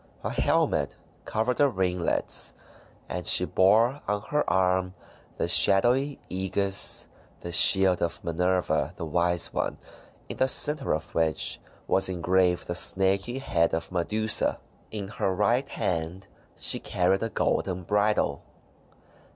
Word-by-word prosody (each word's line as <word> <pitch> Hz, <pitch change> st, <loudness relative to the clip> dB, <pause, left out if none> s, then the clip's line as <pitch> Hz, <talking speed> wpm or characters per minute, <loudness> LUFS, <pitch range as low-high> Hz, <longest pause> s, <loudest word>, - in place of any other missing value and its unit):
A -, -, -3 dB
helmet -, -, 0 dB, 0.3 s
covered 115 Hz, +3 st, -2 dB
her 145 Hz, -1 st, +4 dB
ringlets, 90 Hz, -5 st, -1 dB, 0.5 s
and -, -, -4 dB
she -, -, +7 dB
bore 115 Hz, +9 st, +2 dB
on 105 Hz, 0 st, -1 dB
her 150 Hz, 0 st, 0 dB
arm 90 Hz, 0 st, 0 dB, 0.4 s
the -, -, -2 dB
shadowy 125 Hz, +8 st, +4 dB
aegis 95 Hz, +1 st, -1 dB
— -, -, -31 dB
the 85 Hz, -, -7 dB
shield 95 Hz, +1 st, +5 dB
of 85 Hz, -, -3 dB
Minerva 90 Hz, +2 st, -1 dB
the 85 Hz, -, -6 dB
Wise 85 Hz, +2 st, 0 dB
One -, -, -3 dB, 0.3 s
— -, -, -29 dB
in -, -, -8 dB
the 130 Hz, -, +2 dB
centre 145 Hz, -, +2 dB
of 75 Hz, -, -8 dB
which 80 Hz, -2 st, 0 dB, 0.3 s
was 95 Hz, 0 st, +2 dB
engraved 90 Hz, 0 st, 0 dB
the 85 Hz, -, -4 dB
snaky 95 Hz, +7 st, +1 dB
head 85 Hz, -12 st, 0 dB
of 80 Hz, +2 st, -5 dB
Medusa. 105 Hz, +5 st, -2 dB, 0.3 s
In 105 Hz, -3 st, -6 dB
her 100 Hz, -1 st, -2 dB
right 120 Hz, +8 st, 0 dB
hand 85 Hz, +2 st, -4 dB, 0.3 s
she -, -, +3 dB
carried 95 Hz, +2 st, 0 dB
a 115 Hz, -, -2 dB
golden 95 Hz, -3 st, -2 dB
bridle. 105 Hz, -6 st, 0 dB
95 Hz, 135 wpm, -26 LUFS, 90-110 Hz, 0.5 s, she